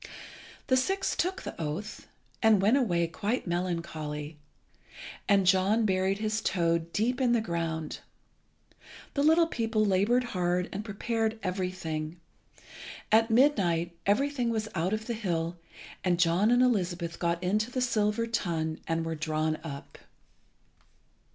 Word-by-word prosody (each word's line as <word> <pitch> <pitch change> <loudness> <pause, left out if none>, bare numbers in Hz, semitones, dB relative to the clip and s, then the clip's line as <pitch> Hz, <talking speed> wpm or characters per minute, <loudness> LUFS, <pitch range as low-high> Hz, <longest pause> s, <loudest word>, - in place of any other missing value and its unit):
The 260 - +3
six 385 +9 0
took 370 +2 -1
the - - -5
oath, 190 +7 -5 0.3
and 220 -2 +5
went 210 +6 +4
away 175 -11 +2
quite 205 +8 -2
melancholy; 165 -4 -3 0.9
and 200 -2 +4
John 195 +5 +3
buried 190 0 +1
his 215 +1 -1
toad 170 -2 0
deep 245 +7 0
in 245 -2 +3
the 235 - +3
ground. 165 -6 -3 1.1
The 280 - 0
little 320 +3 +5
people 225 -7 0
laboured 205 +6 +3
hard, 180 -5 -1
and 200 +2 -4
prepared 225 +1 -2
everything. 180 -4 -3 0.9
At 225 +1 +5
midnight 190 - +2
everything 250 +3 +1
was 220 -1 -1
out 180 +1 0
of 215 0 -2
the 235 - -2
hill; 175 -6 -2 0.5
and 175 -2 +1
John 175 +5 +3
and 245 +1 +5
Elizabeth 175 -8 0
got 170 0 -1
into 210 +5 +1
the 255 - -3
silver 225 -2 +1
tun, 165 -8 -2
and 165 0 -1
were 165 - -2
drawn 155 0 -1
up. 140 -4 -8
190 Hz, 135 wpm, -29 LUFS, 170-225 Hz, 1.1 s, and